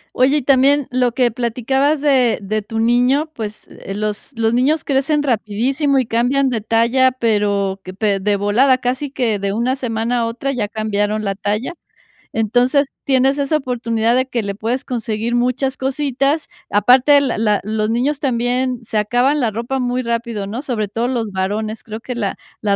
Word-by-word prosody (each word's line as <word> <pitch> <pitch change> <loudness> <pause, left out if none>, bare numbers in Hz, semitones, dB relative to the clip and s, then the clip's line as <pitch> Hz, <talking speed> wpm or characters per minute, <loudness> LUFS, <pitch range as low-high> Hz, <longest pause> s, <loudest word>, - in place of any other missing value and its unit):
Oye, 265 +4 +3
y - - 0
también 275 +1 +3
lo 250 -1 +1
que 245 -1 +2
platicabas 260 +5 0
de 265 -5 +3
de 215 +2 -2
tu 225 +2 -5
niño, 250 +7 +2
pues, 215 -5 -6
eh, 195 - -8
los 210 +5 -4
los 225 0 +1
niños 275 +6 +2
crecen 290 +2 +1
rapidísimo 265 +4 0
y 255 - 0
cambian 250 +5 +1
de 240 -3 -1
talla, 230 +4 +2
pero 205 -5 0
que 185 0 -9
pe 200 0 0
de 205 +1 +1
volada, 225 +7 +3
casi 255 +3 -2
que 240 -6 -1
de 195 0 -2
una 245 +5 0
semana 235 -1 -1
a 230 - 0
otra 240 +4 -3
ya 235 -6 -2
cambiaron 215 0 -1
la 195 -1 -1
talla. 210 - -2 0.6
Entonces, 245 +6 +2 0.2
tienes 270 +1 +3
esa 280 +2 +1
oportunidad 235 -5 0
de 260 - +2
que 240 -3 -2
le 200 0 -3
puedes 235 +6 -2
conseguir 230 -2 -3
muchas 255 +2 0
cositas. 275 +2 0 0.2
Aparte, 260 +7 +5
la 270 -4 -1
la 210 -2 +1
los 215 +1 -1
niños 260 +6 0
también 250 -1 -1
se 220 - -3
acaban 245 +7 +2
la 235 -5 +1
ropa 235 +5 -3
muy 250 0 -1
rápido, 230 -3 -2
¿no? 220 +6 -5
Sobre 230 -8 -2
todo 230 +4 -1
los 235 -4 -2
varones, 210 +3 -3
creo 220 0 -7
que 250 +1 -6
la 205 -5 -2 0.3
la 205 -2 +1
240 Hz, 180 wpm, -18 LUFS, 215-265 Hz, 0.6 s, Aparte